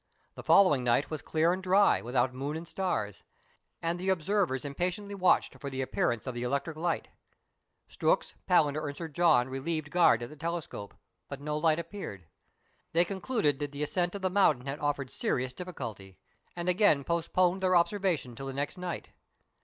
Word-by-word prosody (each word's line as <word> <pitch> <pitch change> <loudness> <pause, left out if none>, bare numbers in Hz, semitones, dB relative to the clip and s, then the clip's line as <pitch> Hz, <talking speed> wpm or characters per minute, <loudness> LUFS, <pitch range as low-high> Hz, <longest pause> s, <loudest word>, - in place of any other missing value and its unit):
The - - -9
following 165 -10 +5
night 125 +5 +2
was 155 - -3
clear 165 +2 +2
and 185 - -4
dry, 190 +2 +4
w^ithout 125 +1 0
moon 140 +4 -3
and 165 +1 -8
stars, 170 - -2 0.6
and 170 +1 -1
the 185 +1 -2
observers 180 -5 +1
impatiently 180 +8 -3
watched 185 -2 +2
for 140 - -4
the 130 0 -3
appearance 120 -3 -1
of 130 - -3
the 120 - -5
electric 140 +5 -2
light. 165 +2 -2 0.8
Strux, - - 0 0.2
Palander, 155 -4 +3
and 145 - -8
Sir 165 - -4
John 155 -5 +3
relieved 145 +3 -3
guard 165 -9 +4
at 120 - -6
the - - -10
telescope, 165 -9 -5 0.3
bnt 140 -1 -7
no 150 +1 -2
light 155 0 +2
appeared. 165 - -7 0.7
They 170 +2 +4
con 190 0 -5
cluded 205 - +1
that 145 -1 -4
the 145 +1 -3
ascent 175 +4 -1
of 200 - -6
the 185 - +1
mountain 155 -10 +3
had 140 +2 -4
offered 145 -3 -2
serious 125 0 -1
difficulty, 115 - -7 0.4
and 175 0 -4
again 180 -6 +4
postponed 175 +3 +1
their 185 -1 +3
observations 170 - +1
till 135 - -6
the 135 - -4
next 145 +6 -3
night. 180 -1 -5
155 Hz, 180 wpm, -30 LUFS, 135-180 Hz, 0.8 s, following